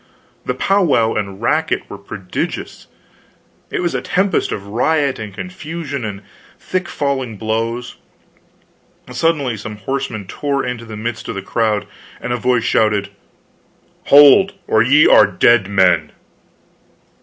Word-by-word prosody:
The - - -2
powwow 165 - +2
and 100 0 -4
racket 155 +6 +1
were 100 - -9
prodigious; 95 -2 -5 0.8
it - - -2
was 175 -3 -1
a 125 - -1
tempest 190 +8 0
of 100 - -4
riot 140 +6 0
and 110 -1 -6
confusion 155 - -6
and 105 -2 -6 0.3
thick 185 -1 -3
falling 130 -6 -2
blows. 115 +3 -3 1.1
Suddenly 135 -3 0
some 105 +1 -7
horsemen 110 -1 -4
tore 140 +7 -2
into 125 -2 -5
the 110 -1 -8
midst 110 +1 -5
of - - -4
the 95 - -5
crowd, 110 0 0 0.3
and 125 - -3
a - - -1
voice 125 0 +1
shouted: 105 -2 +1 1.0
"Hold 145 +8 +7
or 110 - +3
ye 140 +6 +5
are 105 - +7
dead 100 +1 +3
men!" 95 -3 +3
120 Hz, 130 wpm, -18 LUFS, 105-145 Hz, 1.1 s, Hold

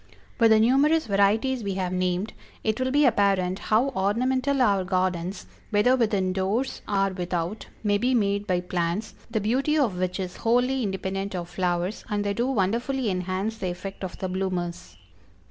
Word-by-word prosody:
With 230 -1 +6
the 220 0 +6
numerous 280 +8 +4
varieties 220 +5 +2
we 200 -2 -2
have 185 -1 -2
named, 185 +3 -1 0.3
it 220 +1 0
will 260 0 0
be 290 +2 +4
apparent 195 -5 +2
how 230 +6 +2
ornamental 255 +6 0
our 200 -6 +3
gardens, 185 0 -1 0.2
whether 220 +4 +4
within 205 -6 +1
doors 200 +8 -1
or 195 -1 +1
without, 180 +1 -3 0.2
may 205 -1 +2
be 250 +3 +2
made 200 -2 +1
by 180 -2 +1
plants, 180 +4 -2 0.2
the 225 -1 0
beauty 265 +9 +1
of 225 -11 +1
which 180 +1 -1
is 185 -1 -4
wholly 245 +3 +2
independent 195 -1 -3
of 175 -1 -4
flowers, 180 +2 -1
and 205 -1 0
they 200 0 0
do 235 +4 0
wonderfully 240 +2 0
enhance 185 +4 -2
the 185 - -2
effect 195 +3 -7
of 185 - -5
the 190 - -3
bloomers. 185 -2 -3
200 Hz, 170 wpm, -25 LUFS, 185-235 Hz, 0.3 s, With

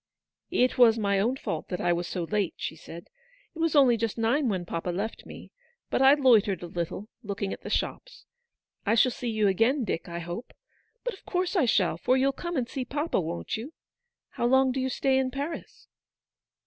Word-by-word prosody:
" - - -62 0.2
It 255 - -3
was 230 -2 +7
my 200 -2 +1
own 235 +6 +1
fault 165 -11 -4
that 180 - -4
I 175 0 +2
was 175 0 -2
so 175 -3 -3
late/' 205 0 -1
she - - -4
said. 165 +1 -11 0.2
" - - -33
It - - -9
was 325 -1 +1
only 260 -5 +6
just 225 0 -2
nine 240 +4 +2
when 185 -4 -2
papa 170 +1 -4
left 200 +6 -4
me; - - -11 0.4
but - - +1
I 270 +2 +7
loitered 220 - +3
a - - -3
little, 175 +4 -4
looking 200 -3 -3
at - - -9
the - - -7
shops. - - -3 0.6
I 220 +2 +2
shall 255 +2 +4
see 240 0 -4
you 215 -2 +2
again, 230 +8 +2
Dick, 180 -5 -3
I 170 - -5
hope. 175 +7 -6 0.5
But - - -2
of 385 - -14
course 365 +1 -1
I 335 -8 +4
shall, 190 -8 +2
for 255 +9 +2
you'll 270 +1 +3
come 345 +4 -5
and 245 -3 0
see 260 +1 -4
papa, 295 +3 -1
won't 85 - -4
you? 255 +9 -8 0.6
How 240 - -1
long 265 +1 +4
do 265 - -2
you 260 0 0
stay 265 0 +1
in 260 -1 0
Paris 285 +5 -6
230 Hz, 215 wpm, -27 LUFS, 190-270 Hz, 0.6 s, was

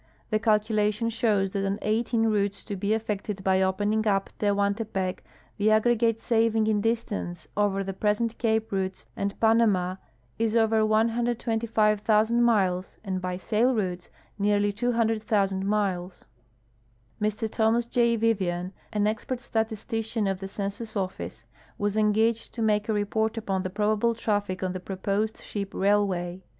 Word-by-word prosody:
The 215 - +2
calculation 215 0 +1
shows 210 -4 +1
that 195 0 -2
on 195 +1 -1
eighteen 225 +2 +1
routes 205 -2 0
to 205 - -5
be 200 +3 0
affected 210 -2 -4
by 190 0 +3
open 190 +3 +1
ing 220 - +2
u]) 200 -3 +3 0.2
Te]iuantc[)ec 200 -2 0 0.4
the 210 +1 +2
aggregate 230 +1 +2
saving 225 -1 +2
in 215 -1 +1
distance 220 -5 -2
over 200 -1 +1
the 195 0 -4
present 210 +4 0
cape 220 -1 0
routes 190 -1 -2
and 200 0 -3
Panama 210 -5 +3 0.4
is 225 0 +1
over 225 -1 +3
125,000 225 -1 +2
miles 190 -6 +1
and 190 -3 -3
l)y 180 0 -2
sail 230 +6 +1
routes 185 -4 -2 0.3
nearly 205 0 +2
200,000 215 -4 0
miles. 190 -4 -1 1.0
Mr 215 +2 0
Thomas 225 +2 +1
J. 235 0 +2
Vivian, 190 -5 0 0.2
an 210 -1 +1
expert 220 +4 -2
statistician 225 -1 -2
of 195 -1 -1
the 195 - -5
Census 205 +3 -5
Office, 115 - -4 0.3
was 205 0 -1
engaged 220 +2 +1
to 230 - -1
make 210 0 +1
a - - +3
report 220 +2 0
upon 195 -4 -1
the 185 - -3
probable 215 +3 +1
traffic 205 -4 -1
on 185 -1 -1
the 185 - -4
proposed 200 +3 -2
ship 200 -2 -5
railway. 190 -3 +1
210 Hz, 145 wpm, -26 LUFS, 195-225 Hz, 1.0 s, by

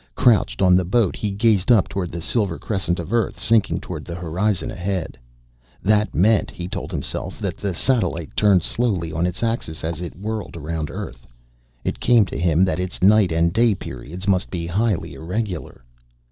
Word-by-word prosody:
Crouched 95 - +3
on 90 -1 +6
the 90 - +3
boat 105 +3 +1
he 105 - -2
gazed 105 +1 +2
up 110 -5 +5
toward 95 -3 -3
the 85 - -5
silver 95 -1 +1
crescent 95 -4 -1
of 85 +6 -5
Earth 120 -1 0
sinking 115 -2 +2
toward - - -7
the 85 - -7
horizon 90 +3 -1
ahead. 90 -4 -3 0.7
That 105 +1 +2
meant, 105 +3 +3
he 85 - -6
told - - -5
himself, - - -4
that - - -3
the 100 -3 -3
satellite 85 - 0
turned 100 -5 +4
slowly 95 -9 0
on 80 +3 0
its 90 +5 -3
axis 115 -9 -2
as 80 +1 -3
it 85 - -6
whirled 105 -2 -5
around 80 -1 -4
Earth. 65 -2 -7 0.6
It - - -3
came 120 -4 +5
to 95 - -6
him 85 +1 +3
that 95 - -1
its 90 0 -4
night 100 -2 +5
and 85 +1 +2
day 115 -1 +3
periods 85 +6 -7
must 95 -2 +2
be 85 -2 -4
highly 100 +2 -1
irregular. 90 - -4
95 Hz, 185 wpm, -22 LUFS, 85-105 Hz, 0.7 s, on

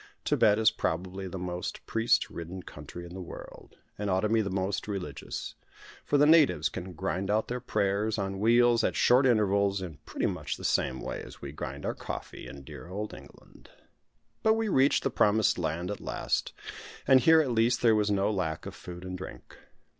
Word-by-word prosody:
Thibet 105 -1 +4
is 110 -1 +4
probably 95 +3 -3
the 95 - -6
most 90 0 -5
priest 115 +1 +1
ridden 85 +2 -7
country 75 +4 -9
in 85 - -10
the 95 - -6
world, 90 - -11 0.2
and 105 -1 -2
ought 95 0 +2
to 105 - 0
be 110 0 +3
the 100 - -2
most 95 +2 -2
religious; 95 -9 -5 0.5
for 145 - +2
the 145 - +6
natives 155 -1 +5
can 95 0 -7
grind 95 +2 -2
out 110 +1 +1
their 125 +1 -2
prayers, 105 -2 0
on 95 -1 -3
wheels, 120 +1 +4
at - - +1
short 130 +2 +5
intervals, 100 -4 +2
in 90 -6 -7
pretty - - -2
much - - -2
the - - -11
same 65 -1 0
way - - -5
as - - -11
we 70 - -5
grind 75 - -6
our - - -1
coffee - - -7
in 70 -1 -10
dear 65 - -10
old 105 +4 -5
England. - - -15 0.7
But 220 0 +4
we 225 -1 -1
reached 135 -5 +3
the - - 0
promised 105 -2 +3
land 85 +3 -2
at 105 - -6
last; - - -2 0.6
and 130 - +7
here 160 +5 +6
at 145 -5 +1
least 115 +2 +2
there 115 -2 +6
was 105 -1 +2
no 100 +1 +2
lack 90 -6 -2
of - - -6
food 90 0 -9
and 95 0 -5
drink. 90 -9 -9
100 Hz, 200 wpm, -29 LUFS, 90-115 Hz, 0.7 s, and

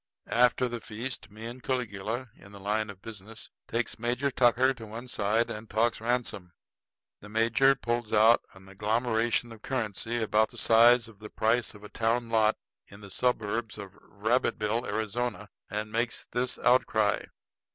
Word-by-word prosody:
After 125 +1 +4
the 120 -1 -5
feast 115 +2 -6
me 110 +2 -10
and 120 +2 -7
Caligula, 120 -1 -3
in 100 - -16
the 100 - -10
line 105 +2 -1
of 100 -2 -11
business, 110 0 -9 0.2
takes 115 -1 -2
Major 125 +4 0
Tucker 125 +1 +4
to 115 -4 -10
one 115 +4 -8
side 110 0 0
and 105 +1 -7
talks 115 +1 +1
ransom. 115 -7 -2 0.7
The 105 - -12
major 115 +5 +4
pulls 120 -3 -2
out 110 +2 +6
an 95 0 -15
agglomeration 115 +3 0
of 110 -2 -12
currency 115 -2 -2
about 110 0 +2
the - - -14
size 115 +1 +6
of 110 -3 -16
the 105 0 -9
price 115 +1 0
of 105 - -14
a 105 - -9
town 115 +1 0
lot 110 -1 +3 0.3
in 100 +1 -14
the 100 -2 -11
suburbs 115 -2 -1
of 100 -2 -8
Rabbitville, 110 +1 -1
Arizona, 110 -1 -2 0.2
and 105 +1 -4
makes 115 +1 -2
this 125 +1 -1
outcry. 110 -4 +2
115 Hz, 160 wpm, -29 LUFS, 105-120 Hz, 0.7 s, out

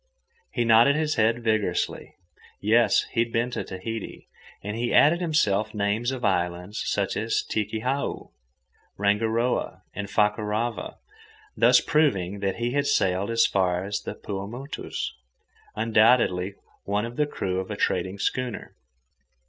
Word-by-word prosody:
He 120 -3 0
nodded 115 +5 +6
his 155 0 0
head 115 0 +1
vigorously. 110 -5 -1 0.4
Yes, 115 +3 +3
he 115 - -2
had 115 0 +1
been 120 +2 0
to - - -3
Tahiti, 110 +4 -7 0.4
and 105 +1 -4
he 120 +1 -1
added 170 +4 +5
himself 110 - +1
names 105 +4 0
of 130 -3 -3
islands 90 +1 -1
such 100 -1 0
as 115 +2 0
Tikihau, 115 +6 -2 0.7
Rangiroa, 110 +4 0
and 100 +1 -5
Fakarava, 105 +2 -1 0.6
thus - - +5
proving 100 - +1
that 100 -1 -1
he 120 +1 -2
had 145 +2 0
sailed 95 -7 +1
as 115 0 +3
far 90 -2 +1
as 100 +1 -3
the - - -6
Paumotus—undoubtedly 105 - -1 0.3
one 100 +2 -1
of 120 +1 -7
the 150 +1 +1
crew 95 -9 -2
of 95 - -5
a 105 - -4
trading 95 +1 -1
schooner. 125 +3 -3
110 Hz, 130 wpm, -25 LUFS, 100-120 Hz, 0.7 s, nodded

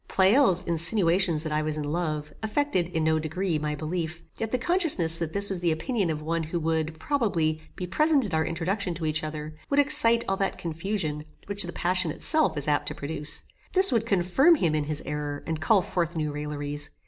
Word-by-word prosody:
Pleyel's 190 -1 +3
insinuations 170 -1 +2
that 155 - -4
I 150 0 +1
was 155 0 -2
in 150 - -3
love, 150 -1 -3
affected, 220 - 0
in 165 -3 -1
no 160 0 +2
degree, 160 +1 -2
my 150 0 -2
belief, 165 +2 -4
yet 225 - -3
the 255 - 0
consciousness 260 - +3
that 165 -2 -3
this 200 +2 +3
was 190 - -1
the 170 -1 +1
opinion 185 +4 -1
of 155 -1 -3
one 165 +1 -1
who 165 +2 -3
would, 160 0 -2
probably, 170 - 0
be 180 - -4
present 290 - +2
at 195 - -5
our 160 0 +2
introduction 180 +3 -2
to 160 0 -4
each 155 0 -1
other, 155 0 -6 0.2
would 280 - 0
excite 235 -5 +4
all 195 - 0
that 195 0 -1
confusion 165 -2 -3 0.2
which 200 0 -1
the 175 -3 +1
passion 180 -1 0
itself 310 - +2
is 145 - -1
apt 145 -1 +1
to - - -4
produce. 150 +1 -3 0.3
This 380 -2 +6
would 230 -2 +1
confirm 205 - +4
him 170 - 0
in 150 -1 0
his 150 0 -4
error, 145 0 -4
and 160 -1 -3
call 200 +1 +3
forth 170 -1 -2
new 155 -2 -2
railleries. 145 0 -4
165 Hz, 205 wpm, -26 LUFS, 155-200 Hz, 0.3 s, This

